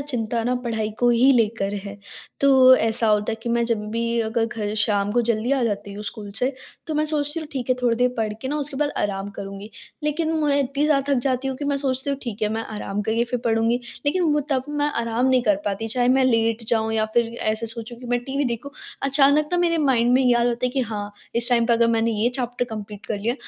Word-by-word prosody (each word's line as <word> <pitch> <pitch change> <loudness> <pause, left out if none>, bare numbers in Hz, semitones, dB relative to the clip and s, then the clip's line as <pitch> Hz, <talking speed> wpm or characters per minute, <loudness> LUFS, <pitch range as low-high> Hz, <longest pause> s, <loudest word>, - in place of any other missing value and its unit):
चिंता 240 -5 -2
न 250 +1 +1
पढ़ाई 220 -2 -2
को 245 - +3
ही 240 +3 +5
लेकर 220 -4 +1
है। 200 0 -7 0.4
तो 265 -2 +7
ऐसा 225 0 +1
होता 210 +1 +2
है - - -4
कि 235 - -4
मैं 235 0 +1
जब 230 -3 -1
भी 230 +1 -1
अगर 225 +1 0
घर 215 -3 -4
शाम 205 -1 +1
को 240 - +2
ज़ल्दी 235 +2 0
आ 270 -3 +1
जाती 205 -2 -3
हूँ 205 +1 -7
स्कूल 210 -1 -7
से 255 +3 0 0.3
तो 315 - -3
मैं 305 +1 +1
सोचती 300 +1 -1
हूँ 310 - -7
ठीक 260 -3 -4
है - - +5
थोड़ी 235 -2 +2
देर 250 +1 +3
पढ़ 220 -2 -1
के 260 - -3
न - - -2
उसके 290 -2 -3
बाद 290 +1 0
आराम 200 0 -2
करुँगी। 195 +2 -7 0.3
लेकिन 310 +2 -1
मैं 285 -1 +2
इतनी 280 +2 -1
ज़्यादा 285 -2 +2
थक 255 - +1
जाती 260 +1 0
हूँ 265 - -3
कि 290 - -5
मैं 285 0 0
सोचती 270 0 -2
हूँ 275 - -2
ठीक 220 -4 -6
है 210 - +2
मैं 225 +1 -2
आराम 205 0 -3
करके 225 +3 0
फिर 250 - 0
पढ़ूँगी। 230 +1 +1 0.3
लेकिन 360 +6 +2
वो 295 - +2
तब 260 -2 +1
मैं 295 0 0
आराम 230 +2 0
नहीं 260 -1 +3
कर 210 -4 +3
पाती 205 +2 -2
चाहे 245 +2 +1
मैं 260 +1 +4
लेट 230 -2 +1
जाऊँ 225 -1 +1
या 220 -1 +2
फिर 235 -1 +2
ऐसे 215 +1 -1
सोचूँ 230 +1 -7
कि 245 - -10
मैं 245 0 0
टीवी 275 +2 -1
देखूँ। 245 +2 -3 0.3
अचानक 280 +2 +4
न 350 - +2
मेरे 335 -1 +2
माइंड 240 -1 +3
में 260 - +4
याद 240 -1 +3
होता 240 +1 0
है - - -2
कि 265 +1 -1
हाँ, 210 -4 -4 0.2
इस 235 0 +6
टाइम 235 -1 +3
पे 235 - +3
अगर 235 0 +4
मैंने 230 0 +2
ये 220 +1 +1
चैप्टर 245 -1 -2
कंप्लीट 210 -3 -8
कर 205 - -2
लिया 235 +4 0
235 Hz, 250 wpm, -23 LUFS, 220-265 Hz, 0.4 s, तो